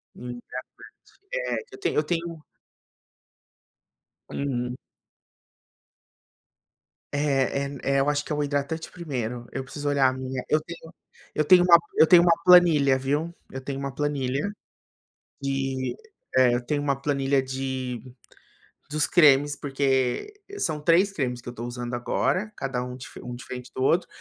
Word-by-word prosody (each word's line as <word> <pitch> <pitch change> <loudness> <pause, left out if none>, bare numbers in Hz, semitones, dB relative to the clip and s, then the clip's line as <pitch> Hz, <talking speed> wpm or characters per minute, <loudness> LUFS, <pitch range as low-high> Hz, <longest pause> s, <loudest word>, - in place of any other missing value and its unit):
Um 125 - -9
hidratante, 120 +1 -7 0.9
é. - - -1
Eu 400 - -10
tenho 390 - -1
eu 150 - +3
tenho 165 -1 -3 1.9
Uhum. 125 -3 -2 2.4
É 140 -1 +1
é 140 0 -6
é, 140 0 +2
eu 140 +2 +2
acho 145 0 0
que - - -8
é - - +1
o 150 - 0
hidratante 145 +3 -2
primeiro, 125 -8 -4
eu 135 - -4
preciso 145 +2 -4
olhar 140 -2 +4
a - - -3
minha 130 -1 -4
eu 155 - +4
tenho 165 +1 -11 0.4
eu 155 - +1
tenho 180 0 +7
uma 170 -1 +8 0.2
eu 160 - +7
tenho 175 0 +8
uma 170 - +5
planilha, 165 -7 +6
viu, 145 +6 -1 0.2
eu 135 - -6
tenho 135 +1 -5
uma 140 -1 -4
planilha 145 +3 -1 0.9
de 135 -1 -2 0.4
eh, 125 -2 +5
eu - - -1
tenho 145 -1 0
uma 140 -2 0
planilha 140 -1 +1
de, 130 -2 -4 0.9
dos 150 +1 +1
cremes 145 -3 +5
porque, 135 - 0 0.2
são 155 - -1
3 175 +5 +4
cremes 125 -8 -2
que - - -16
eu - - -6
estou 120 0 -7
usando 120 0 -5
agora, 185 - 0
cada 135 -2 -2
um 125 0 -7 0.3
um 125 0 -6
diferente 125 0 -8
do 130 - -3
outro, 170 +6 +3
140 Hz, 150 wpm, -25 LUFS, 130-155 Hz, 2.4 s, uma